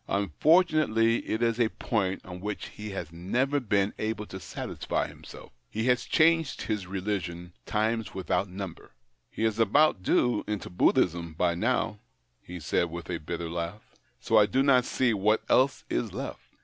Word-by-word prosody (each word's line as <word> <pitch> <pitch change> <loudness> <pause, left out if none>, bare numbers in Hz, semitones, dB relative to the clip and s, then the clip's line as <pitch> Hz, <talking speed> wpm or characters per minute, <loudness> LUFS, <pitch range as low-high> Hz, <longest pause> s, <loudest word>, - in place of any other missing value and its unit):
Unfortu 155 - +3
nately, 115 -4 +3
it 110 +2 0
is 115 0 +1
a 115 -2 +3
point 100 -6 -2
on 90 -1 -8
which 105 0 -4
he 105 0 -8
has 90 -5 -5
never 125 +12 0
been 100 -5 +1
able 110 -1 -2
to 95 - -8
satisfy 80 - -3
himself. - - -12 0.2
He 110 - -3
has 125 -1 +2
changed 165 -2 +2
his 105 -4 -3
religion 90 -3 -4
times 110 +1 -1
without 95 0 -1
number. 95 -7 -8 0.3
He - - -4
is 110 0 0
about 115 +1 +4
due 120 +4 +2
into 105 -3 -4
Buddhism 85 -2 +2
by 85 +1 +2
now," 105 +2 0 0.4
he 90 0 -8
said 85 +2 0
with 85 +1 -6
a 85 - -2
bitter 85 +2 -4
laugh, 85 +5 -5
" - - -40
for 110 -1 +4
I 105 - +4
do 135 +4 +2
not 130 -3 +4
see 125 -3 +1
what 105 +2 +2
else 135 +1 +3
is - - -2
left. - - -6
105 Hz, 175 wpm, -28 LUFS, 90-115 Hz, 0.4 s, about